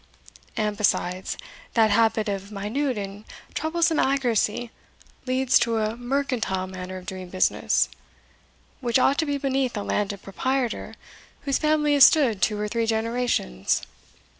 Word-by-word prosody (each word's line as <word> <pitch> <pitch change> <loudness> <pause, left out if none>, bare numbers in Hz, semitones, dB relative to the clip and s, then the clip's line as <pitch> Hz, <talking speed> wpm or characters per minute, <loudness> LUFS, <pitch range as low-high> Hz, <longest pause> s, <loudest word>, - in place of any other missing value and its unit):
And 210 -1 -1
besides, 185 -3 0 0.4
that 220 -2 +4
habit 220 0 +3
of 200 0 -4
minute 225 +6 -2
and 200 +1 -6 0.3
troublesome 325 0 +1
accuracy 240 -3 +1 0.6
leads 260 +1 +3
to 230 -1 +1
a 215 0 -1
mercantile 245 -6 -1
manner 185 0 -7
of 185 - -10
doing 185 -1 -7
business, 185 0 +2 0.9
which 240 -2 +1
ought 270 +2 +3
to 320 - +1
be 285 0 0
beneath 270 -3 -1
a 205 - -2
landed 200 -1 -2
proprietor 255 +4 -2 0.5
whose 275 -2 0
family 305 -1 +2
has 280 -2 +9
stood 250 - +3
two 210 -1 +1
or 210 - -1
three 230 +1 -1
generations. 225 - 0
230 Hz, 140 wpm, -25 LUFS, 205-265 Hz, 0.9 s, has